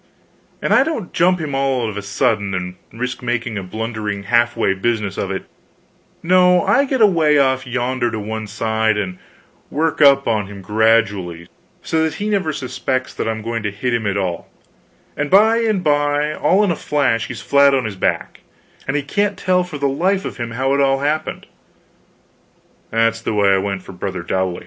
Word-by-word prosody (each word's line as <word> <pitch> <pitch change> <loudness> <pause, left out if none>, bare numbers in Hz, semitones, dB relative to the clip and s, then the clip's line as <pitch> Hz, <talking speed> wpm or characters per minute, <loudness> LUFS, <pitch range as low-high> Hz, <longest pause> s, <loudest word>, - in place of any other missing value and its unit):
And - - +2
I - - +6
don't 275 - -4
jump 180 +1 +3
at - - -4
him 145 -2 -4
all 135 -3 0
of 105 - -5
a 100 - -4
sudden, 100 -1 0
and 90 0 -4 0.2
risk 125 +2 -4
making 120 -2 -2
a - - -5
blundering 105 +1 -4
half 120 +3 +2
way 105 -4 +2
business 105 -1 -1
of 95 - -3
it; 95 0 -4 0.8
no, 180 0 +4
I 280 - +3
get 265 -3 -1
away 165 -8 +4
off 130 -1 +2
yonder 125 0 -1
to 110 - -4
one 110 +1 -5
side, 110 0 0
and 95 -3 -4 0.5
work 155 +1 -1
up 140 -1 +6
on 110 -4 0
him 100 -1 -10
gradually, 105 -5 +1 0.4
so 160 - 0
that 160 -2 -1
he 210 +1 -3
never 190 -6 0
suspects 130 -1 -3
that - - -3
I'm 110 -1 -3
going 115 0 -3
to 105 - -2
hit 120 +5 -3
him 115 -3 0
at 100 0 -1
all; 90 -4 -3 0.7
and 145 +1 -2
by 220 +5 +5
and 215 -5 0
by, 145 0 +1
all 195 +6 +2
in 200 - +2
a - - 0
flash, 130 -8 0
he's - - -7
flat 140 0 +4
on 130 -3 0
his 110 -2 -4
back, 95 - -2 0.5
and 135 +2 0
he 145 - -2
can't 205 +7 -1
tell 180 -1 +1
for 180 -4 -7
the 140 0 0
life 185 +8 0
of - - -6
him 120 -2 -4
how 130 +4 -1
it 140 - +2
all 135 0 +2
happened. 155 +2 -2 1.4
That 115 0 +2
is 115 - -10
the 110 - -2
way 100 -1 +3
I 95 - +3
went 100 -1 -3
for - - -10
brother 95 -1 -5
Dowley. 95 0 -1
120 Hz, 200 wpm, -19 LUFS, 105-150 Hz, 1.4 s, I